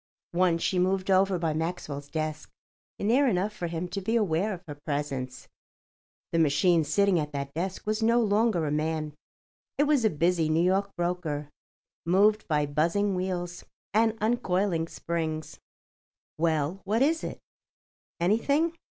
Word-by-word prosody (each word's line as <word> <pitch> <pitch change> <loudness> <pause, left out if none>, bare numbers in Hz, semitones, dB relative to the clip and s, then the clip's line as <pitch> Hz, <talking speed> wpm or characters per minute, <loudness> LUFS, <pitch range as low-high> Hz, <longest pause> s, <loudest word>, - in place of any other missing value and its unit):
Once 175 -1 +2
she 185 - +1
moved 190 +1 +1
over 190 0 +4
by 165 -2 -1
Maxwell's 155 -3 -4
desk, 155 -1 -3 0.5
near 250 +7 +3
enough 205 -1 0
for 175 -4 -4
him 170 +1 -3
to 195 +3 -4
be 225 +5 -1
aware 200 -2 +1
of 185 -2 -6
her 145 - -5
presence. 140 -3 -4 0.8
The 165 - +1
machine 160 +2 +3
sitting 200 +2 +2
at 150 -1 -4
that 140 0 -4
desk 185 +4 -4
was 215 +1 -1
no 230 +2 +4
longer 210 -5 +2
a 145 - -1
man; 155 0 -1 0.6
it 290 - +4
was 290 -4 +3
a 220 - +4
busy 165 0 +1
New 160 +2 +3
York 195 +2 +2
broker, 175 -4 -2 0.5
moved 205 +5 +3
by 150 -2 +1
buzzing 170 +8 +1
wheels 180 -1 -3 0.3
and 220 +1 +3
uncoiling 195 -7 0
springs. 160 -2 -4 0.8
"Well—what 170 - 0
is 320 +3 +1
it? - - -5 0.8
Anything?" 280 - +2
175 Hz, 145 wpm, -28 LUFS, 155-205 Hz, 0.8 s, over